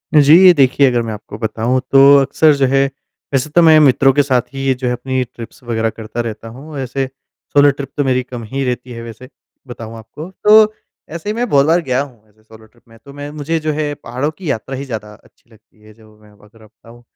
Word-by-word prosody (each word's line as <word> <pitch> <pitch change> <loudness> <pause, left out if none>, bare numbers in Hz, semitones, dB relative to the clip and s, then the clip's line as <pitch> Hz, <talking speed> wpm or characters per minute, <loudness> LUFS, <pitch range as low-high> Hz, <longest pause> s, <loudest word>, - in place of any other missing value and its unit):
जी, 150 0 +6
ये 180 - +9
देखिए 135 -1 +3
अगर 120 -1 0
मैं 110 - -5
आपको 105 0 -10
बताऊँ 115 +3 -1
तो 135 - +6 0.2
अक्सर 145 +3 +3
जो 140 - +1
है, 135 +1 +2 0.5
वैसे 135 +3 0
तो 170 +4 +3
मैं 160 -2 +6
मित्रों 135 -2 +4
के 145 +1 +3
साथ 130 -3 +1
ही 135 0 -5
ये 130 - +3
जो 125 0 -5
है, 125 - 0
अपनी 130 +1 -2
ट्रिप्स 120 0 -12
वग़ैरह 115 -1 -1
करता 110 +2 -6
रहता 115 -1 -7
हूँ। 140 +6 -10
ऐसे 135 +1 -3 0.5
सोलो 145 0 +5
ट्रिप 140 -1 -8
तो 145 - +1
मेरी 130 -1 +1
कम 125 -2 -9
ही 135 0 -2
रहती 125 0 -4
है, 115 -1 -8
वैसे 115 +2 -11 0.4
बताऊँ 115 -2 -9
आपको। 150 +10 -10
तो 215 0 +6 0.4
ऐसे 170 +5 -6
ही - - -1
मैं 245 +1 -1
बहुत 140 0 +3
बार 165 +3 +2
गया 130 -3 -1
हूँ, 115 -6 -11
ऐसे 110 +1 -30
सोलो 110 0 -17
ट्रिप 120 +2 -28
में। 115 0 -18
तो 140 - -13
मैं 145 +1 -8
मुझे 155 +2 -3
जो 155 0 -2
है 150 -1 -2
पहाड़ों 130 +5 -3
की 180 -5 -6
यात्रा 130 +4 -5
ही 140 - -6
ज़्यादा 105 -5 -7
अच्छी 110 +2 -24
लगती 110 0 -25
है, 110 0 -17
जो 110 -1 -21
मैं 105 0 -20
अगर 105 0 -24 0.2
आपको - - -16
बताऊँ। 115 +2 -19
130 Hz, 240 wpm, -16 LUFS, 115-145 Hz, 0.5 s, ये